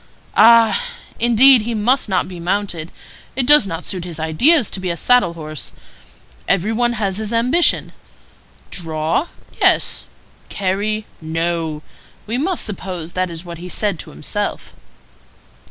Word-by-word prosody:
Ah! 230 - +6 0.4
indeed 240 +2 +6
he 230 +2 -3
must 235 +3 +1
not 185 -2 0
be 180 -2 -9
mounted. 175 -2 -2 0.4
It 255 -1 0
does 295 -6 +7
not 165 -1 -5
suit 185 -3 -4
his 170 -3 -7
ideas 230 - +3
to - - -4
be 185 -1 -3
a 170 - -2
saddle 245 -5 +3
horse. 155 -2 -7 0.7
Every 195 +4 +1
one 240 +1 +1
has 200 -3 -2
his 215 0 -3
ambition. 250 +9 +2 0.8
'Draw? 160 - -1 0.3
Yes. - - +2 0.4
Carry? 205 +3 -2 0.2
No.' 160 -1 -2 0.4
We 230 +4 -2
must 355 +4 -1
suppose 180 -4 -6
that 185 0 -1
is 165 +1 -8
what 170 -1 -8
he 180 +1 -8
said 200 -3 -1
to - - -6
himself." 75 +2 -4
195 Hz, 140 wpm, -18 LUFS, 170-230 Hz, 0.8 s, does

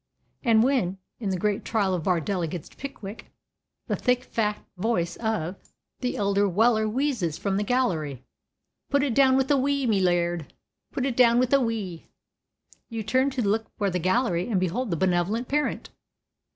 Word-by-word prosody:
And 225 -3 +4
when, 235 -9 +1 0.2
in 210 -5 -2
the 190 - 0
great 210 +2 0
trial 205 -5 0
of 175 -4 -2
Bardell 180 +1 0
against 165 -1 -5
Pickwick, 220 -6 -8 0.6
the - - -1
thick, 250 0 +1
fat 210 -4 -1 0.2
voice 180 -4 -1
of 210 -6 -2 0.4
the 250 0 -2
elder 200 -1 +2
Weller 220 +3 +3
wheezes 230 - -1
from 195 -1 -1
the 205 - +1
gallery, 165 - 0 0.7
"Put 280 0 +2
it 275 -5 0
down 265 +1 +5
with 265 +1 +1
a 285 - +5
wee, 280 0 +1
me 210 -5 +2
Lerd, 175 -3 +1 0.4
put 265 - -2
it 265 -3 -1
down 235 -1 +5
with 255 +1 +2
a 275 - +5
wee," 210 -8 -3 0.8
you 225 -2 -4
turn 260 +6 +2
to 255 -6 -1
look 220 +2 +1
for 200 -2 0
the 180 - -1
gallery 185 +1 +1
and 200 -5 +2
behold 195 +7 -1
the 170 - -1
benevolent 190 +7 +1
parent. 295 +1 -1
215 Hz, 175 wpm, -26 LUFS, 185-250 Hz, 0.8 s, down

